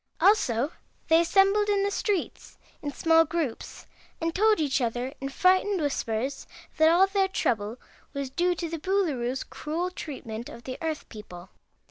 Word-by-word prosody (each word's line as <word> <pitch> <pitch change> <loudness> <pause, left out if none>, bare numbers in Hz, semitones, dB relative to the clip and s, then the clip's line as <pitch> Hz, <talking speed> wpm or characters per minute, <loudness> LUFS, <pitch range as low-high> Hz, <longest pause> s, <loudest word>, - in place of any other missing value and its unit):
Also 315 - +3 0.4
they 325 +1 +6
assembled 395 +4 +3
in 400 -1 +2
the 405 - 0
streets 400 -3 -3 0.2
in 290 - -3
small 325 +2 +4
groups 320 -7 -4 0.3
and 330 0 -1
told 430 +3 +3
each 285 -3 +1
other 245 +3 -2
in 275 - -3
frightened 370 +6 +3
whispers 270 -3 -2 0.3
that 315 0 +6
all 350 +3 +6
their 390 0 +1
trouble 225 - -1 0.3
was 280 -2 -4
due 350 +5 +1
to 340 0 -3
the 330 0 -5
Boolooroo's 290 -9 0
cruel 335 +4 -4
treatment 240 -9 -7
of 235 - -11
the 255 - -6
Earth 320 -2 -3
people. 185 -5 -11
320 Hz, 155 wpm, -27 LUFS, 260-370 Hz, 0.4 s, they